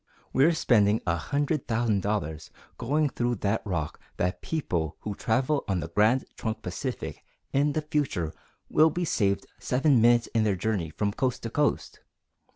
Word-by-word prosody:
We're 145 +6 +5
spending 110 -7 +3
a 85 - +2
hundred 145 - -1
thousand 110 -3 +1
dollars 80 -6 -2 0.3
going 145 +5 +1
through 120 -1 -1
that 100 +3 +1
rock 85 -7 -3 0.2
that 90 +1 -1
people 85 - -2
who 105 - -4
travel 130 +8 0
on 95 -3 0
the 85 - -5
Grand 110 +8 +3
Trunk 110 -1 -4
Pacific 90 -1 -5 0.3
in 145 +1 +2
the 155 - -1
future 145 - -1 0.3
will 155 +1 +5
be 175 +3 -2
saved 100 -9 +1
seven 130 -1 +3
minutes 120 0 +5
in 115 -1 +3
their 105 -3 +2
journey 95 -4 -1
from 100 +5 -2
coast 125 +2 -1
to 115 - -4
coast! 150 +1 0
110 Hz, 160 wpm, -27 LUFS, 100-140 Hz, 0.3 s, We're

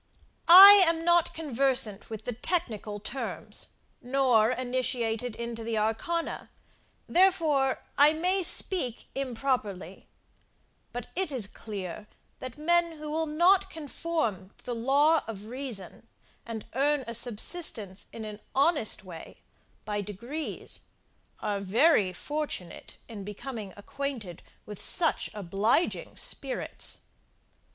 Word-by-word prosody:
I 390 +3 +11
am 330 0 0
not 345 -1 +3
conversant 260 -8 +1
with 220 -1 -7
the 245 - -3
technical 220 - -2
terms, 260 +6 -5 0.3
nor 250 -4 +3
initiated 245 -2 -2
into 235 -1 -5
the 225 -1 -2
arcana, 275 +11 -2 0.6
therefore 325 -8 +2 0.2
I 290 +1 +8
may 365 +4 +1
speak 335 - +1
improperly; 240 -8 -3 0.8
but 245 -1 -5
it 375 -3 0
is 250 -7 0
clear, 205 -1 -7 0.3
that 255 0 -8
men 340 +2 +2
who 305 -1 -7
will 320 +1 -1
not 365 +5 +3
conform 300 - -3
to - - -21
the 245 - -3
law 280 +7 +3
of 210 -3 -7
reason, 230 -5 -4 0.4
and 225 -2 -6
earn 285 +2 +1
a 230 - -6
subsistence 225 - -2
in 225 -1 -7
an 210 -1 -8 0.2
honest 275 - +2
way, 175 -4 -11 0.4
by 210 -1 -2
degrees, 235 +11 -6 0.6
are 205 -2 -2
very 205 - +3
fortunate 290 - -5
in 215 -4 -8
becoming 210 0 -7
acquainted 225 - -6 0.2
with 210 -2 -8
such 340 -4 +1
obliging 205 - 0
spirits. - - -1
250 Hz, 115 wpm, -28 LUFS, 215-310 Hz, 0.8 s, I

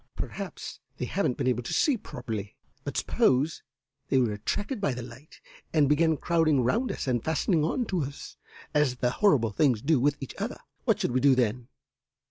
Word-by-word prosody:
Perhaps - - -6 0.2
they - - -2
haven't 125 - -1
been - - -1
able 125 -2 +1
to 120 - -5
see 290 - +3
properly, 110 - -6 0.3
but - - -4
suppose 135 +5 +2 0.5
they 135 - +3
were 120 -5 +2
attracted 205 - -3
by 140 -10 0
the 125 - -5
light 125 +5 -13 0.4
and 150 -3 +5
began 160 +2 +3
crowding 155 -6 +2
round 230 - +1
us - - -4
and 125 -4 0
fastening 160 +1 +1
on 240 +10 0
to 185 -5 -1
us, 140 0 -6 0.4
as 150 -4 +2
the 125 0 0
horrible 135 - +3
things 125 +1 +2
do 145 +4 +2
with 145 +3 +2
each 135 - -7
other. - - -3 0.3
What - - +2
should - - 0
we 130 - +2
do 135 0 +5
then? 120 -1 0
135 Hz, 190 wpm, -28 LUFS, 125-160 Hz, 0.5 s, and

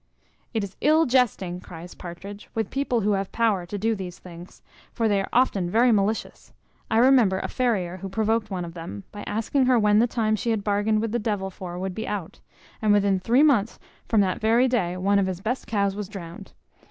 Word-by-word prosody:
"It 220 - -1
is 200 -1 -7
ill 315 +3 +4
jesting," 225 -9 +1
cries 175 0 -10
Partridge, 195 +4 -9
"with 220 -3 -2
people 270 -4 0
who 210 +1 +1
have 195 -1 -1
power 210 -6 +1
to 205 - -4
do 225 +3 +1
these 185 -4 -6
things; 175 0 -13 0.3
for 230 -2 0
they 200 -2 +2
are - - -5
often 205 -8 +2
very 235 +5 +4
malicious. 215 +1 -1 0.4
I 220 - +1
remember 240 -6 +5
a - - -3
farrier, 195 -8 -1
who 195 +1 -7
provoked 220 +1 0
one 185 -3 -3
of 170 - -9
them, 165 - -8
by 205 - -8
asking 230 +5 0
her 255 -1 +4
when 210 -1 +4
the 235 - +4
time 220 -2 0
she 230 - -3
had 220 -3 0
bargained 210 +1 +1
with 225 -1 -2
the 240 - 0
devil 205 -3 -2
for 180 -1 -7
would 190 0 -3
be 220 +3 -5
out; 195 -5 -5 0.4
and 215 -1 +3
within 200 -2 +3
three 240 +9 +3
months 235 -8 +3 0.3
from 220 -3 +3
that 185 -2 -1
very 230 +4 +4
day 185 -8 0
one 200 +2 +2
of 195 - +1
his 185 -2 -3
best 235 +7 -3
cows 200 -3 0
was 205 -2 -5
drowned. 175 -5 -9
205 Hz, 215 wpm, -25 LUFS, 190-230 Hz, 0.4 s, remember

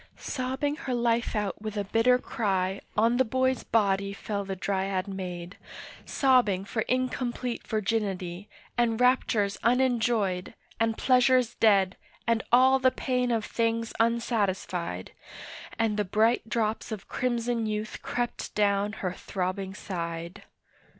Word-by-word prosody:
Sobbing 265 +2 -2
her 260 -6 -3
life 235 0 +1
out 210 -2 -2
with 215 -1 -5
a 205 - 0
bitter 225 +5 +3
cry 195 -5 -1 0.2
On 230 +3 +4
the 260 - +5
boy's 260 +1 +1
body 200 -2 +1
fell 200 0 -3
the 195 -1 -4
Dryad 190 0 -1
maid, 180 -2 -6 0.5
Sobbing 245 -9 +3
for 220 +2 -2
incomplete 255 -1 -2
virginity, 200 -4 -2 0.3
And 235 -2 +1
raptures 235 -5 +2
unenjoyed, 235 -6 +1 0.2
and 225 -1 +1
pleasures 255 -2 +4
dead, 195 -4 +3 0.3
And 230 -1 +2
all 260 +2 +6
the 260 0 +5
pain 250 -1 -1
of 225 -3 0
things 230 0 -1
unsatisfied, 200 - 0 0.7
And 220 -2 +1
the 210 - +2
bright 220 +4 +2
drops 220 -1 -1
of 210 -3 -6
crimson 240 -2 -1
youth 215 0 -4
crept 245 -1 -3
down 205 0 +2
her 180 - -1
throbbing 190 +1 -3
side. 170 -1 -5
220 Hz, 130 wpm, -28 LUFS, 195-245 Hz, 0.7 s, all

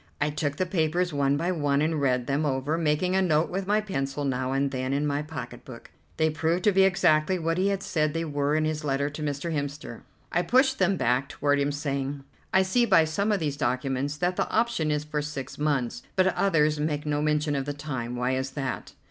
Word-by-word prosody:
I 150 0 +1
took 145 -1 -2
the 185 - +1
papers 175 0 0
one 140 0 +2
by 170 +4 0
one 145 -5 +1
and 155 0 0
read 125 -3 +1
them 140 +4 0
over, 140 +1 0
making 165 +3 +1
a 190 - +3
note 160 -3 +2
with 190 +1 -3
my 210 +1 +3
pencil 145 -8 -3
now 130 -1 -1
and 135 0 0
then 130 0 -2
in 145 +2 0
my 145 0 0
pocket 135 -6 -7
book. 120 -3 -12 0.3
They 160 0 +2
proved 165 +3 0
to 210 - +5
be 195 0 +4
exactly 180 -2 +3
what 165 +1 -1
he 190 - +2
had 195 -1 -1
said 155 -1 0
they 165 0 -1
were 145 -1 0
in 155 0 +2
his 155 0 -2
letter 140 0 0
to 150 - -7
Mr. 150 +3 -2
Hemster. 145 -5 -4 0.3
I 175 - +2
pushed 265 +8 +3
them 190 0 +2
back 125 +1 +1
toward 145 0 +1
him 140 - +1
again, - - -1
saying: 140 -1 -3 0.3
"I 190 0 +4
see 235 +6 +2
by 165 -6 +5
some 200 +7 0
of 205 - +1
these 145 -4 -2
documents 135 +3 -1
that 180 +2 0
the - - 0
option 225 -9 +1
is 150 0 0
for 150 0 -3
six 145 -3 -6
months, 135 -6 0
but 185 - +4
others 155 -5 +2
make 150 -1 -1
no 145 0 0
mention 150 0 +1
of 135 -1 -1
the 145 - -2
time. 130 -5 -5
Why 125 +1 0
is 130 +1 -1
that?" 135 -2 -4
150 Hz, 230 wpm, -26 LUFS, 140-170 Hz, 0.3 s, to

